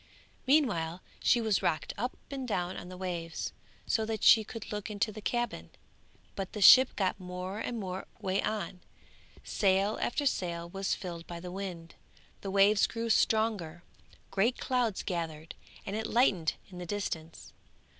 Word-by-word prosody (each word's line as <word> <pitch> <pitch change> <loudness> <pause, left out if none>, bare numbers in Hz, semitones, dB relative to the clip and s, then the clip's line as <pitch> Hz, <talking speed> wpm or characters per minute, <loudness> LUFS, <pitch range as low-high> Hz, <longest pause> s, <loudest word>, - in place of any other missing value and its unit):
Meanwhile 185 - +2 0.2
she 240 - +4
was 215 -3 +1
rocked 155 - 0
up 245 +5 -3
and 265 -2 -4
down 180 -4 -1
on 180 - -7
the 185 - -8
waves, 170 -3 -4 0.3
so 220 - +1
that 220 -1 -3
she 220 - +8
could 220 +1 -8
look 210 0 -4
into 210 +1 -1
the 215 +1 -9
cabin; 240 +3 -2 0.7
but 195 -2 -4
the 210 - -4
ship 255 +6 +9
got 190 -1 0
more 180 +2 -5
and 235 0 -3
more 190 -1 -5
way 190 +1 0
on, 210 -4 -3 0.6
sail 195 +1 +2
after 285 +4 0
sail 170 -9 -1
was 195 +2 -1
filled 170 -3 -7
by 170 -1 -6
the 180 +1 -7
wind, 180 -3 -6 0.5
the 195 - -4
waves 200 +1 +5
grew 230 0 -2
stronger, 210 -8 +1 0.5
great 225 +6 +2
clouds 245 -6 0
gathered, 165 -4 -4 0.3
and 200 - -3
it 220 0 -2
lightened 195 -10 +2 0.2
in 180 - -9
the 175 - -6
distance. 165 -5 -5
195 Hz, 160 wpm, -31 LUFS, 180-220 Hz, 0.7 s, ship